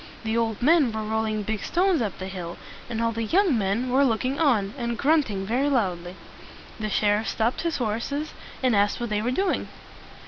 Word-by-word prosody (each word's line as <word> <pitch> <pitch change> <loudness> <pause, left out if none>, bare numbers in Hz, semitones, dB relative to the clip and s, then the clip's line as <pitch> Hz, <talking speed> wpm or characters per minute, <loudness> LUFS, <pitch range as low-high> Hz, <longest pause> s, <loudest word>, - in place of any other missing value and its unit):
The 220 0 -1
old 230 -1 -1
men 300 -3 +5
were 220 0 -3
rolling 215 0 -1
big 215 0 -3
stones 360 -4 +2
up 210 -5 -2
the 185 - -5
hill, 180 -3 -6 0.3
and 230 -1 -2
all 230 - +2
the 230 0 -3
young 355 - +3
men 220 +4 0
were 270 +2 +4
looking 255 +2 0
on, 220 -10 +2
and 235 -3 -3
grunting 270 -10 +1
very 255 +7 +1
loudly. 180 -9 -1 0.6
The 215 -1 -2
sheriff 210 +1 +1
stopped 225 +4 0
his 335 -1 -1
horses, 250 +6 -2 0.3
and 250 -4 +3
asked 205 +3 +2
what 240 -2 -4
they 210 0 +1
were 235 - -1
doing. 375 +9 0
230 Hz, 195 wpm, -25 LUFS, 210-270 Hz, 0.6 s, men